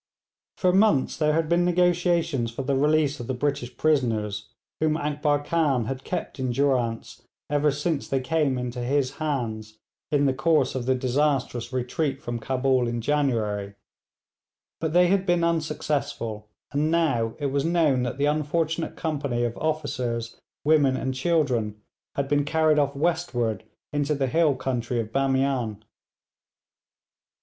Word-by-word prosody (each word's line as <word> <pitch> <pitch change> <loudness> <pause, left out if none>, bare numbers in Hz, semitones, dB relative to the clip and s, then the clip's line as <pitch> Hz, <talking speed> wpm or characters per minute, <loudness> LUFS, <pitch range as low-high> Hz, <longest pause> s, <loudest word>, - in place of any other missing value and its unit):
For 180 -1 +2
months 195 -8 +3
there 150 -1 +2
had 160 0 +1
been 170 +2 +3
negotiations 175 -6 +2
for 115 +4 -5
the 135 +1 0
release 150 +1 +2
of 120 - -6
the 130 - -2
British 125 -3 -2
prisoners 110 -9 0 0.3
whom 155 0 +2
Akbar 145 -1 0
Khan 145 -7 +1
had 135 +3 -4
kept - - -4
in 130 -1 -1
durance 125 -3 0 0.3
ever 145 0 +3
since 145 +1 -1
they 135 - 0
came 140 0 0
into 125 0 -4
his 135 +2 0
hands 110 -8 -3 0.3
in 145 -2 +2
the 135 - +3
course 150 -1 +2
of 130 -1 -4
the 130 - +3
disastrous 130 -2 0
retreat 135 +3 -1
from 120 -5 -4
Cabul 130 +1 +1
in 120 0 -2
January, 110 -7 0 1.0
but 160 -1 -2
they 180 +1 +6
had 190 +1 +2
been 175 -1 +2
unsuccessful, 150 -9 -2 0.2
and 150 +2 +1
now 140 -9 +1
it 145 -3 -2
was 140 0 0
known 160 -6 +2
that 125 +1 -3
the 140 - +1
unfortunate 155 +2 0
company 140 -7 -2
of 120 -1 -1
officers, 125 -7 -2 0.2
women, 145 -4 +4
and 130 - -2
children, 130 -8 0 0.4
had 140 -1 -1
been 145 0 +2
carried 155 0 +3
off 140 -1 +1
westward 140 - -1 0.3
into 145 +1 0
the 135 -1 0
hill 150 +1 +2
country 125 -2 -2
of 110 -1 -4
Bamian. 135 -5 0
140 Hz, 150 wpm, -25 LUFS, 125-155 Hz, 1.0 s, they